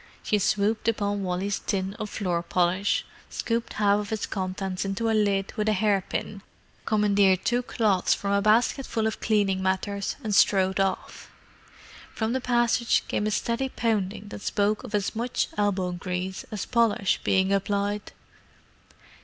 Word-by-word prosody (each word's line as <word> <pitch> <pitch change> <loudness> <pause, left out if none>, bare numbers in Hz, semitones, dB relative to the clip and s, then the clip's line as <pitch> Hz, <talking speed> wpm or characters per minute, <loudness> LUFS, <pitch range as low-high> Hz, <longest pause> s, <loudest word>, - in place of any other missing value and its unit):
She 210 - +1
swooped 210 +2 +1
upon 205 -2 0
Wally's 190 +2 -1
tin 190 -1 -2
of 215 - -4
floor 180 -5 -1
polish, 180 +3 +1 0.2
scooped 230 0 -2
half 205 -1 +3
of 210 0 -5
its 220 -1 -1
contents 185 -1 -3
into 195 +3 -3
the 225 -1 +2
lid 200 -2 +1
with 215 0 0
a - - +3
hair 200 -1 +2
pin, 200 -1 -4 0.4
commandeered 200 -3 +3
two 245 +1 +2
cloths 215 -6 +1
from 200 - -3
a 200 0 +3
basketful 225 +2 +2
of 220 - -2
cleaning 200 -3 +1
matters, 190 +1 -1
and 215 -2 -2
strode 190 -1 +3
off. 195 0 -2 0.8
From 220 +1 -1
the 260 - -1
passage 240 -1 +2
came 210 - -1
a - - +1
steady 235 +5 -1
pounding 210 -4 -2
that 205 - -8
spoke 205 +1 0
of 230 -4 -4
as 205 +2 -1
much 240 +2 -1
"elbow 195 -3 0
grease" 180 +1 -4
as 210 -3 -4
polish 230 -5 +2
being 190 0 +2
applied. 200 +1 -1
205 Hz, 155 wpm, -26 LUFS, 195-220 Hz, 0.8 s, half